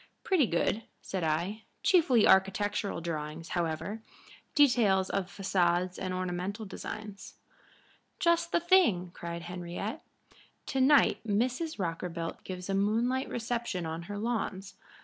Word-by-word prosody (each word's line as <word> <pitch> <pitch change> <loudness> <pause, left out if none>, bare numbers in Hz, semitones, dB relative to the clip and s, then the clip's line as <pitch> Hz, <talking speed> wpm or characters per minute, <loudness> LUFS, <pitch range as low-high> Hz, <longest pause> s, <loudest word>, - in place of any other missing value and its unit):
"Pretty 345 - +3
good," 175 +5 +1 0.2
said 190 -3 -3
I. 170 +8 -1 0.2
"Chiefly 320 - +5
architectural 200 0 +2
drawings, 160 0 -5
however 175 +5 -2 0.5
details 230 -10 +4
of 195 -2 -1
façades 185 -2 0
and 185 - -3
ornamental 185 +4 -3
designs." 205 0 -8 0.8
"Just 340 -2 +2
the - - +3
thing!" 335 - +3
cried 170 0 -6
Henriette. 180 - -5 0.6
"To 270 - -1
night 280 +2 +5
Mrs. 250 +9 -1
Rockerbilt 170 -2 -4
gives 180 -1 -6
a 195 - -1
moonlight 230 +6 +1
reception 230 -6 -2
on 160 +1 -4
her 205 - -4
lawns. 205 -4 -3
195 Hz, 120 wpm, -30 LUFS, 175-235 Hz, 0.8 s, Chiefly